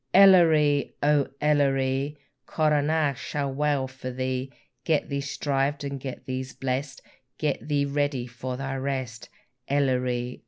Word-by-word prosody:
Elleree! 160 -7 +6
O 145 -1 +3
Elleree! 140 -1 +1 0.3
Coronach 150 -2 +1
shall 140 -2 -3
wail 145 -1 0
for 130 -1 -7
thee; 130 +1 -3 0.3
Get 155 -3 +1
thee 140 -1 -1
shrived 140 0 -1
and 140 -1 -4
get 130 -1 -7
thee 130 0 -3 0.2
blest, 130 +1 -3 0.3
Get 150 -2 -2
thee 145 -1 +1
ready 140 -3 -1
for 125 +1 -6
thy 135 0 -3
rest, 130 -4 -4 0.4
Elleree! 125 -3 0
140 Hz, 125 wpm, -26 LUFS, 130-145 Hz, 0.4 s, Elleree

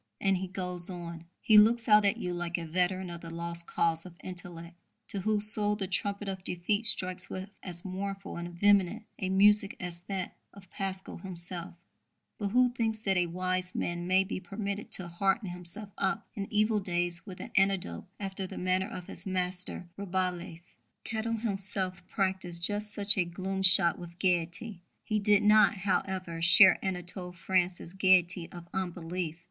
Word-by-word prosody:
And 195 -1 +2
he 190 +1 -4
goes 180 -1 -3
on: 170 -2 -7 0.2
He 215 -1 +7
looks 230 +2 +4
out 210 -1 +6
at 200 - +2
you 180 - -3
like 175 0 -2
a 170 - -5
veteran 180 +2 -1
of 170 -1 -8
the 165 - -8
lost 170 0 -4
cause 165 -1 0
of 180 -2 -12
intellect, 175 -2 -8 0.3
to 200 - +2
whose 210 +1 +2
soul 210 -1 +1
the 200 -2 -2
trumpet 200 +2 -3
of 190 -1 -4
defeat 205 +6 +1
strikes 185 -3 +1
with 190 +2 -6
as 175 -1 -7
mournful 195 +1 -5
and 175 0 -5
vehement 205 +1 +3 0.2
a 185 - -2
music 200 +1 +5
as 175 -1 -3
to 175 - -32
that 190 -2 -4 0.2
of 190 -3 -15
Pascal 190 -1 -3
himself, 175 -1 -6 0.6
but 205 - -1
who 250 +4 +4
thinks 225 -2 -2
that 195 -3 +1
a 180 -1 +2
wise 185 +1 0
man 175 0 -2
may 190 +1 +4
be 190 - -4
permitted 200 +2 -5
to 185 - +4
hearten 190 +4 0
himself 180 +4 -7
up 190 - 0
in 195 -1 -5
evil 215 0 +2
days 175 -2 0
with 185 -2 -9
an - - -8
anecdote 190 - +1
after 195 -1 -4
the - - -9
manner 185 +1 0
of 180 - -7
his - - -2
master 180 -1 -2
Rabelais. 180 -3 -3 0.2
Kettle 225 +1 -2
himself 195 -4 -3
practised 185 -3 -2
just 210 +2 0
such 205 -1 +2
a - - +4
gloom 190 +3 -4
shot 180 -2 +6
with 170 -1 -10
gaiety. 180 +2 -1 0.2
He 215 -1 0
did 205 0 +3
not, 215 +1 +6
however, 185 -3 -2
share 180 +3 +7
Anatole 180 -1 -4
France's 175 0 -1
gaiety 185 -2 +3
of 175 -1 -10
unbelief. 175 -3 -3
185 Hz, 175 wpm, -30 LUFS, 175-200 Hz, 0.6 s, He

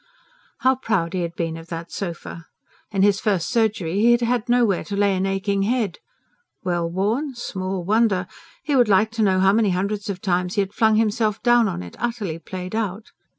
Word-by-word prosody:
How 260 0 +3
proud 195 -9 -1
he 185 - -1
had 170 0 -4
been 165 -2 -2
of 165 0 -11
that 170 0 -7
sofa! 170 -3 -6 0.4
In 195 -2 +1
his 200 -1 +4
first 195 -6 0
surgery 215 -6 0
he 230 +3 +5
had 240 - +2
had 240 -1 0
nowhere 240 -6 +3
to 205 - -4
lay 200 -1 +2
an 190 +1 0
aching 195 +1 0
head. 215 -3 0 0.6
Well 175 -2 -1
worn? 225 - -1
Small 190 -5 -4
wonder! 205 -1 +2 0.4
He 290 - 0
would 245 -4 +4
like 210 +2 +4
to 225 0 -2
know 190 -3 +3
how 195 +1 +4
many 215 -1 +3
hundreds 200 +3 -2
of 190 -2 -3
times 180 -1 -1
he 205 - +3
had 195 0 -4
flung 220 0 +3
himself 215 -1 +1
down 240 -2 +5
on 180 - -4
it, 90 - -11
utterly 220 -9 -3
played 180 +3 -7
out. 215 -1 -3
200 Hz, 200 wpm, -22 LUFS, 185-225 Hz, 0.6 s, he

